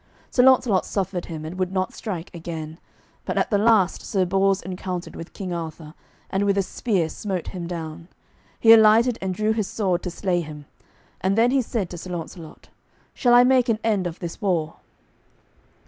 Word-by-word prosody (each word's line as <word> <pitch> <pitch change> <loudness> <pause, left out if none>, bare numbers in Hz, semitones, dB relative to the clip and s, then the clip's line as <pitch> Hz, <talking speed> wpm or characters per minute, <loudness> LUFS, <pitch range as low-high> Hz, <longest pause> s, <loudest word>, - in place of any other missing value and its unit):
Sir 250 - +4
Launcelot 250 -6 +4
suffered 190 -3 -3
him, 155 -2 -7
and 175 +4 -7
would 185 -1 0
not 185 -1 -1
strike 185 -5 -6
again; 160 -1 -7 0.4
but - - -3
at - - +1
the 205 - +3
last 210 -4 +3
Sir 190 -4 0
Bors 195 +1 +1
encountered 180 0 -5
with 165 - -8
King 185 -3 -5
Arthur, 160 -2 -6 0.4
and 195 +1 +1
with 200 -1 +2
a 195 - +3
spear 190 -4 -1
smote 185 +1 -4
him 175 -3 -6
down. 165 -1 -6 0.5
He 225 0 +8
alighted 225 +2 +5
and 190 0 -2
drew 215 +4 0
his 215 -3 -1
sword 185 -5 -1
to 180 - -4
slay 175 0 -1
him, 150 -2 -9 0.6
and 190 +3 +1
then 235 +2 +4
he 270 0 +3
said 220 -5 -2
to 175 - -7
Sir 185 - -9
Launcelot, 165 -2 -8 0.4
"Shall 240 -1 +3
I 245 - +8
make 255 -1 +3
an 225 - +2
end 205 -5 +1
of 170 0 -7
this 170 -3 -7
war?" 170 -6 -1
185 Hz, 190 wpm, -23 LUFS, 170-215 Hz, 0.6 s, He